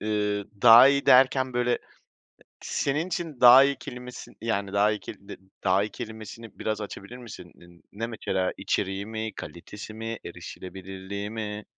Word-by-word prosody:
Eee, 105 -1 -1 0.2
daha 120 +3 +10
iyi 140 0 +1
derken, 130 0 +5
böyle, 125 0 +1
e - - 0 0.8
senin 150 +5 -1
için 165 -6 -5
daha 125 +2 +9
iyi 140 0 +1
kelimesin 125 0 -9
yani, 100 -3 -2
daha 100 +1 +3
iyi 105 - -3
keli 100 -2 -11
de - - -7 0.3
daha 95 +1 +3
iyi 105 - -3
kelimesini 110 -2 -9
biraz 110 0 -2
açabilir 105 +2 -8
misin? 115 -8 -11
Ne 85 - -18 0.3
ne 115 +3 -4
mesela? 95 -5 -2
İçeriği 95 0 -2
mi, 110 0 -4
kalitesi 100 +7 -9
mi, 115 0 -5
erişilebilirliği 95 +2 -7
mi? 105 -1 -5
110 Hz, 160 wpm, -26 LUFS, 100-125 Hz, 0.8 s, daha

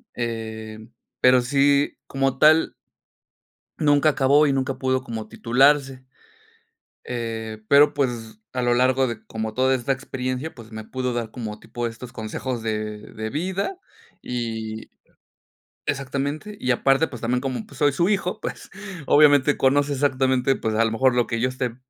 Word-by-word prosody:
em, 110 -1 -5 0.3
pero 125 0 +6
sí, 140 +3 +2
como 135 -1 0
tal 155 +1 +5 1.1
nunca 145 0 +4
acabó 145 +2 +4
y 140 - +2
nunca 135 0 -1
pudo 130 0 0
como 110 -4 -6
titularse, 135 +2 +2 1.1
eh, 110 -2 -4
pero, 145 +1 +6
pues 120 - -2
a 125 - -1
lo 120 0 +3
largo 130 +1 +3
de 110 -2 -6
como 110 -1 -4
toda 130 +2 +2
esta 125 +2 -2
experiencia, 130 +3 -4
pues 115 -2 -13
me 110 0 -7
pudo 125 +1 -3
dar 115 -2 -3
como 110 -3 -6
tipo 120 -1 -4
estos 120 +2 -9
consejos 115 +3 -4
de 105 -1 -3
de 110 0 -4
vida 190 - -2 0.4
y 110 -2 -5 1.0
exactamente, 140 +9 -3
y 130 - 0
aparte, 135 +5 +3
pues 125 - -10
también 125 +2 0
como 130 -4 -3
pues 140 - -15
soy 145 -1 +3
su 170 +7 +1
hijo, 190 -3 -1
pues - - -6 0.4
obviamente 145 -1 +5
conoce 145 +2 +2
exactamente, 130 -1 +1
pues 110 -1 -2
a 115 - +3
lo 110 - 0
mejor 125 +2 +2
lo 120 - +3
que 115 - -2
yo 125 - +2
esté 125 -2 -3
130 Hz, 155 wpm, -23 LUFS, 115-140 Hz, 1.1 s, pero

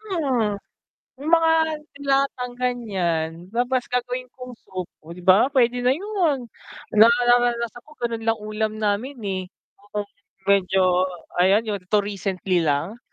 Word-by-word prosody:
Hmm, 270 - 0 0.6
yung 295 +3 -3
mga 330 -1 +5 0.4
de-latang 275 -3 0
ganiyan, 195 -10 -1 0.2
tapos 245 +1 +1
gagawin 250 +1 -2
kong 250 -1 -9
soup, 185 -2 -5
oh, 155 - -13
'di 180 - -12
ba 190 +6 +6
puwede 245 -3 +2
na 250 - +3
yun, 340 - -1 0.5
nararanasan 240 +1 +4
ko 300 - -16
ganun 230 -1 -2
lang 225 0 +2
ulam 215 0 -2
namin, 215 +6 -1
eh, 190 -2 -2 0.5
kung 205 -1 -2 0.4
medyo 185 -2 +3 0.3
ayan 190 +4 +4
yun, 205 -2 -2
'to 205 +2 +2
recently 195 -2 -1
lang. 160 +8 -1
230 Hz, 135 wpm, -23 LUFS, 195-250 Hz, 0.6 s, ba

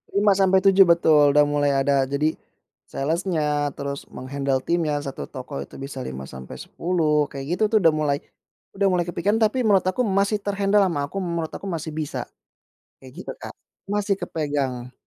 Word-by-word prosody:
5-7, 195 -1 +5
betul. 155 -4 +5
Udah 150 0 +5
mulai 145 -1 +1
ada 135 0 +2
jadi, 150 +3 +1 0.6
sales-nya, 150 -1 -1
terus 140 0 -5
meng-handle 135 0 -2
timnya, 165 -3 0
1 135 - -5
toko 70 - -6
itu 70 - -10
bisa 135 0 -7
5-10, 150 - -2
kayak 135 -1 -6
gitu - - +1
tuh 220 - +5
udah 165 -3 +5
mulai 150 -2 0 0.6
udah 195 0 +2
mulai 175 -1 +1
kepikiran, 190 +5 0
tapi 220 +4 +2
menurut 195 -4 +4
aku 185 +7 0
masih 200 +1 +1
ter-handle 200 0 +2
ama 145 -4 -1
aku, 195 - -7
menurut 170 -3 -3
aku 200 - -7
masih 160 -2 -4
bisa, 155 -1 -4 0.8
kayak 130 -1 -13
gitu - - -6
Kak. - - -8 0.4
Masih 205 -1 +1
kepegang. 140 -7 -3
155 Hz, 155 wpm, -23 LUFS, 140-190 Hz, 0.8 s, 5-7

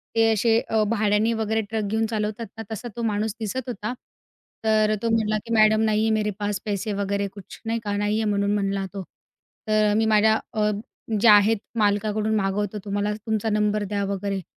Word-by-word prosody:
ते 225 0 +4
असे 225 +2 +3 0.3
भाड्याने 215 0 +2
वगैरे 220 0 0
ट्रक 220 -1 -1
घेऊन 220 0 +1
चालवतात 215 +1 -3
ना, 225 - -5
तसा 220 +3 -5
तो 235 - -4
माणूस 210 -1 0
दिसत 245 +4 -4
होता. 215 +1 -4 0.7
तर 215 -1 +3
तो 230 - 0
म्हणला 215 -1 +1
की 230 - -3
"मॅडम 215 0 +5
नही 215 0 +2
है - - +2
मेरे 210 0 0
पास 205 -1 -2
पैसे 205 0 -2
वगैरे 200 0 -1
कुछ." 200 -3 -11
नाही 230 +1 -1
का, 205 -1 -2
"नाही 205 +1 0
आहे" 215 - 0
म्हणून 200 0 +1
म्हणला 195 -1 -1
तो. 195 -1 -5 0.6
तर 215 -1 +3
"मी 225 - +2
माझ्या 220 0 +4
अ, 210 -1 +1 0.5
जे 235 - +5
आहेत 210 +1 +6 0.2
मालकाकडून 210 +1 +1
मागवतो, 205 +1 -1
तुम्हाला, 205 +1 -1
तुमचा 220 0 0
नंबर 210 0 +1
द्या" 200 0 -2
वगैरे. 195 0 -3
215 Hz, 185 wpm, -24 LUFS, 205-220 Hz, 0.7 s, आहेत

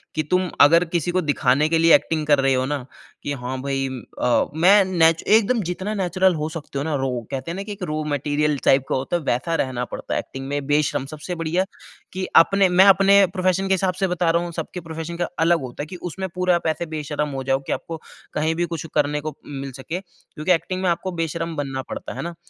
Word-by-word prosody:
कि 155 - 0
तुम 180 +4 0
अगर 165 +4 +7
किसी 170 0 -1
को 185 +1 +1
दिखाने 145 -2 +2
के 165 - +2
लिए 165 0 +5
एक्टिंग 155 -2 0
कर 145 -2 +4
रहे 135 0 +3
हो 130 0 +1
ना, 140 -2 -3 0.4
कि 145 - -2
हाँ, 130 0 -5
भई 135 0 -1 0.3
अ, 125 -1 +3
मैं 195 +5 +6
नेचु 165 -3 +3
एकदम 225 +2 +4
जितना 190 +4 -3
नेचुरल 185 -1 +2
हो 155 0 -2
सकते 160 -3 -7
हो 140 - -1
ना 155 -1 -1
रहो। 130 -3 -2
कहते 135 +5 -4
हैं - - -5
ना, 195 - -4
कि 210 - -8
एक 200 -2 -7
रॉ 155 0 -2
मटेरियल 145 +1 0
टाइप 135 0 +5
का - - +1
होता 135 +6 -2
है - - -6
वैसा 140 +6 0
रहना 125 -2 -3
पड़ता - - -6
है - - +1
एक्टिंग 135 0 -7
में 145 0 -3
बेशर्म। 145 -2 +1
सबसे 155 +4 -6
बढ़िया 165 +3 0 0.5
कि 185 +1 -3 0.2
अपने 195 +1 +2
मैं 180 +2 +6
अपने 195 0 +6
प्रोफ़ेशन 185 0 +1
के 195 - +3
हिसाब 190 0 +1
से 190 - +3
बता 180 -1 0
रहा 170 +1 +1
हूँ। 175 - -5
सबके 180 - -5
प्रोफ़ेशन 165 +1 -6
का 175 -1 -1 0.2
अलग 170 -1 +3
होता 130 +2 -6
है - - -5
कि 185 - -8 0.2
उसमें 190 +3 -4
पूरा 180 -1 +2
आप 170 - -2
ऐसे 160 +2 -1
बेशर्म 150 0 -2
हो - - -4
जाओ 135 0 +1
कि - - -2
आपको 165 - -5 0.4
कहीं 160 +2 0
भी 175 +1 0
कुछ 160 - -6
करने 150 0 +1
को 155 -1 -5
मिल 135 -1 -6
सके 160 +7 -5
क्योंकि 175 -2 -6
एक्टिंग 185 +2 -2
में 185 - +2
आपको 180 +2 -1
बेशर्म 165 +1 -4
बनना 135 -2 -3
पड़ता - - -6
है - - -5
ना? 170 0 -5
165 Hz, 240 wpm, -22 LUFS, 145-180 Hz, 0.5 s, अगर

